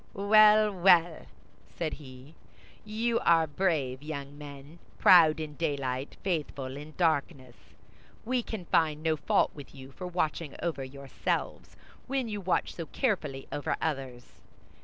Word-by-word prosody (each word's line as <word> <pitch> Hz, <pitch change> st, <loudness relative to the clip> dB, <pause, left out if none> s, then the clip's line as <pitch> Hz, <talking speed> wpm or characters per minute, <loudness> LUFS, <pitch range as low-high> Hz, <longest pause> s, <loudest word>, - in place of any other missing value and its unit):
"Well, 215 Hz, +1 st, +5 dB
well!" 175 Hz, -3 st, +3 dB, 0.5 s
said 160 Hz, -3 st, -2 dB
he, 130 Hz, 0 st, -12 dB, 0.5 s
"you 225 Hz, +2 st, -1 dB
are 165 Hz, -1 st, +4 dB
brave 145 Hz, -6 st, -1 dB
young 145 Hz, -2 st, -7 dB
men, 145 Hz, +2 st, -11 dB, 0.2 s
proud 160 Hz, -4 st, +6 dB
in 155 Hz, -1 st, -5 dB
daylight, 140 Hz, -4 st, -3 dB
faithful 145 Hz, -7 st, -3 dB
in 150 Hz, +2 st, -10 dB
darkness. 140 Hz, -7 st, 0 dB, 0.7 s
We 250 Hz, +1 st, 0 dB
can 220 Hz, -6 st, -7 dB
find 155 Hz, -2 st, +1 dB
no 160 Hz, -1 st, +2 dB
fault 150 Hz, -, +1 dB
with 145 Hz, -2 st, -12 dB
you 130 Hz, 0 st, -11 dB
for 180 Hz, +6 st, -7 dB
watching 165 Hz, -3 st, -2 dB
over 160 Hz, -6 st, -2 dB
yourselves, 135 Hz, +1 st, -4 dB, 0.3 s
when 265 Hz, -2 st, -1 dB
you 210 Hz, -2 st, -4 dB
watch 185 Hz, -1 st, 0 dB
so 165 Hz, -2 st, -7 dB
carefully 155 Hz, -, -2 dB
over 145 Hz, -, -2 dB
others. 135 Hz, -5 st, -5 dB
155 Hz, 135 wpm, -29 LUFS, 140-180 Hz, 0.7 s, proud